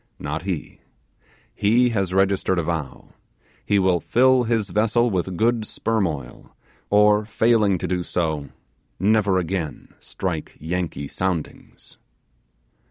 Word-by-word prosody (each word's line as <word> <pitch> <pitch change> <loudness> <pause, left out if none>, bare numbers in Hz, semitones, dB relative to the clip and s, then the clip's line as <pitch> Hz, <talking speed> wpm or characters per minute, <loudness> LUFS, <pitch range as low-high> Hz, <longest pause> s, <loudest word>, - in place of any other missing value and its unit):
Not 75 +2 -4
he. 95 -5 -5 0.7
He 120 +4 +3
has 100 -5 -1
registered 95 -1 +1
a 85 - +1
vow: 80 -4 -4 0.5
he 105 - +1
will 95 -2 +3
fill 130 +5 +3
his 110 -4 0
vessel 115 +4 +2
with 95 -1 -2
good 115 +1 +2
sperm 110 -1 -1
oil, 70 -6 -8 0.3
or 105 +1 +4
failing 110 -3 +2
to - - -4
do 90 -1 -1
so, 80 -5 -2 0.5
never 100 0 +3
again 90 -3 -3
strike 85 -5 -5
Yankee 80 -3 -3
soundings. 90 0 -5
95 Hz, 120 wpm, -22 LUFS, 85-110 Hz, 0.7 s, or